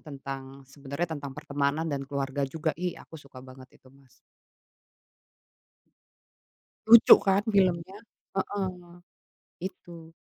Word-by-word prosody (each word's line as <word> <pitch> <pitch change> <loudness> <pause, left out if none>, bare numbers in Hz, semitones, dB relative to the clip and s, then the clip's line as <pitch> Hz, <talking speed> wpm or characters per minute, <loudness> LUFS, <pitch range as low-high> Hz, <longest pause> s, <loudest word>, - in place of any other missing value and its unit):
tentang 135 -2 -9
sebenarnya 140 +5 -5
tentang 140 -3 -7
pertemanan 145 0 -1
dan 140 -1 -4
keluarga 140 0 -3
juga, 160 +1 -2
ih 180 +1 -4
aku 160 - -13
suka 135 -2 -14
banget 130 0 -13
itu, 130 - -22
Mas. 135 -1 -23 2.8
Lucu 230 +1 +10
kan 195 +1 +1
filmnya? 190 -1 +1 0.4
Heeh, 195 0 -2 0.9
itu. 170 -3 -9
145 Hz, 105 wpm, -27 LUFS, 135-175 Hz, 2.8 s, Lucu